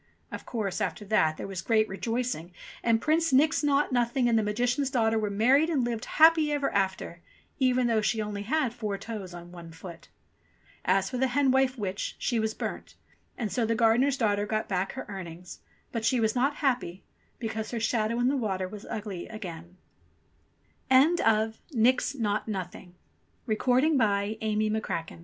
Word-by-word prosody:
Of - - -8
course, 205 -6 -3
after 210 - -3
that 160 -7 +2
there - - -5
was 195 -2 -5
great 220 0 +2
rejoicing, 225 -3 -3 0.3
and 230 -1 +2
Prince 320 +4 +1
Nix 285 +2 +4
Naught 290 0 +2
Nothing 245 0 +1
and 235 - +3
the 220 - +4
Magician's 245 +6 0
daughter 225 -3 +1
were 210 -1 -1
married 255 +10 +3
and 290 -7 +1
lived 235 -2 -3
happy 315 -1 +6
ever 290 -1 -1
after, 190 -3 -1 0.4
even 255 -1 +3
though 230 -2 +2
she 220 +1 0
only 210 -1 -3
had 260 +2 0
four 215 -5 -3
toes 205 -4 -7
on 175 0 -10
one 170 -2 -10
foot. 170 +1 -11 0.8
As 190 +1 +1
for 250 - -3
the 265 - +3
hen 270 +1 +2
wife 265 0 +2
witch, 200 -2 -3
she 235 - -1
was 220 0 -1
burnt, - - -6 0.4
and 220 -5 -3
so 235 +5 0
the 230 +1 +1
gardener's 240 +4 +3
daughter 205 -4 +1
got 215 0 -1
back 190 0 -1
her 265 - -6
earnings; 180 -3 -8 0.3
but 230 -2 -3
she 250 +2 +2
was 220 -1 +1
not 275 +4 +1
happy, 240 -9 -1 0.3
because 220 -2 -4
her 235 - -3
shadow 225 0 0
in 245 +1 +2
the 275 - +2
wat 210 -8 -1
225 Hz, 150 wpm, -28 LUFS, 200-255 Hz, 0.8 s, happy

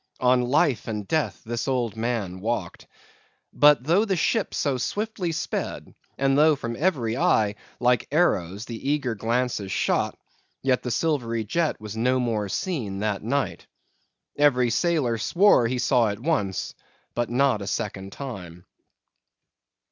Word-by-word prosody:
On 125 0 +4
life 130 +1 +1
and 105 -3 -4
death 155 -1 -1
this 120 +2 -3
old 120 -5 0
man 110 -5 -2
walked. 105 -4 -3 0.7
But 145 -4 +5
though 170 +9 +3
the 200 -4 0
ship 210 +5 0
so 135 -3 0
swiftly 205 - -2
sped, 160 - -4 0.2
and 135 0 +2
though 155 +1 +5
from 115 -4 -5
every 130 -8 0
eye, 115 - +2 0.3
like 125 0 +2
arrows, 105 - +1
the 120 +3 -5
eager 145 -5 0
glances 115 -2 -1
shot, - - 0 0.5
yet 130 -2 +2
the 125 - -4
silvery 120 -6 0
jet 160 +9 -1
was 105 0 -7
no 125 +3 +1
more 110 -5 -1
seen 115 - -3
that 105 -2 -1
night. 140 +6 -2 0.7
Every 125 -5 +3
sailor 130 -5 +1
swore 170 - +4
he 125 +2 -1
saw 120 -2 +3
it 100 0 -3
once, 115 - -1 0.4
but 120 0 -1
not 125 -3 +2
a 100 - -5
second 100 -3 -3
time. 90 -11 -8
125 Hz, 145 wpm, -25 LUFS, 110-145 Hz, 0.7 s, But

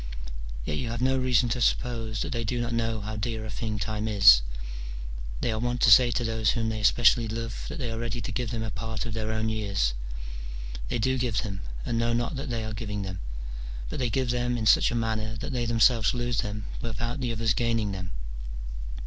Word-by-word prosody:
Yet 75 - -1
yon 120 - -2
have 120 +1 -3
no 130 0 +3
reason 125 -2 +3
to 120 +2 -1
suppose 115 -2 +1
that - - -4
they 115 -2 -1
do 120 +2 -1
not 120 0 -1
know 115 -1 0
how 110 +1 -4
dear 110 0 -2
a 110 - -5
thing 110 0 -3
time 105 +1 -2
is: 100 - +8 1.0
they 120 - +1
are 110 - -1
wont 120 +1 -1
to 120 - +6
say 120 +3 +9
to 120 +1 0
those 110 -2 +1
whom 115 -2 +1
they 110 -1 -2
especially 115 +2 +5
love 115 +1 -4
that - - -5
they 125 -5 -2
are 115 - -3
ready 115 0 -2
to 110 - -4
give 125 -3 -2
them 115 -1 -2
a 110 - -3
part 110 0 -4
of 115 - -4
their 110 0 -2
own 110 0 0
years. 100 - 0 0.9
They - - -1
do 130 +3 +1
give 120 -5 0
them, 100 -3 -4 0.2
and 115 - 0
know 115 0 +2
not 120 +6 0
that 135 +1 -4
they 115 -2 -2
are 110 - -4
giving 105 -1 -3
them; 95 -2 -5 0.7
but - - -4
they 125 -2 +1
give 125 +2 +1
them 125 0 0
in 110 - -2
such - - +6
a 120 - -2
manner 110 -1 -1
that 125 +4 -5
they 120 -2 0
themselves 115 +1 +4
lose 120 -1 0
them 105 -1 -3 0.2
without 120 +3 -3
the 125 -2 0
others 115 -1 +1
gaining 115 -3 +1
them. 95 -2 -4
115 Hz, 225 wpm, -28 LUFS, 110-120 Hz, 1.0 s, say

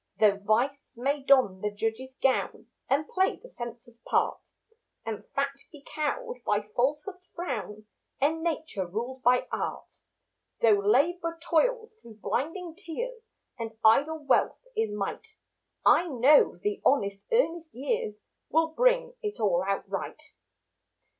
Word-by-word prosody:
Though 205 -2 +5
Vice 235 +7 0
may 280 +4 0
don 260 -9 +4
the 210 - 0
judge's 225 +5 -3
gown 265 -1 +1 0.2
And 285 +3 +2
play 380 0 +1
the - - -15
censor's 240 - -9
part, - - 0 0.6
And 225 -2 -4
Fact 275 0 -2
be 290 -3 -14
cowed 480 +11 -3
by 205 - +1
Falsehood's 300 +9 -1
frown 215 - -4 0.3
And 315 +4 +1
Nature 315 - -2
ruled 240 +8 -4
by 250 0 +3
art; - - -4 0.7
Though 215 -3 +5
Labour 335 - +2
toils 450 +8 +1
through 225 -2 -13
blinding 325 - -3
tears 460 +7 -6 0.4
And 225 -1 -5
idle 295 +7 +4
Wealth 280 - +2
is 225 - +1
might, 205 -1 -5 0.5
I 350 - +6
know 280 - +5
the 205 +3 -2
honest, 200 -7 +2
earnest 340 -9 +1
years 245 -4 -2 0.3
Will 325 +1 +3
bring - - +2
it 420 -1 -4
all 190 -5 +2
out 195 0 -1
right. 195 +9 -4
275 Hz, 135 wpm, -28 LUFS, 220-330 Hz, 0.7 s, I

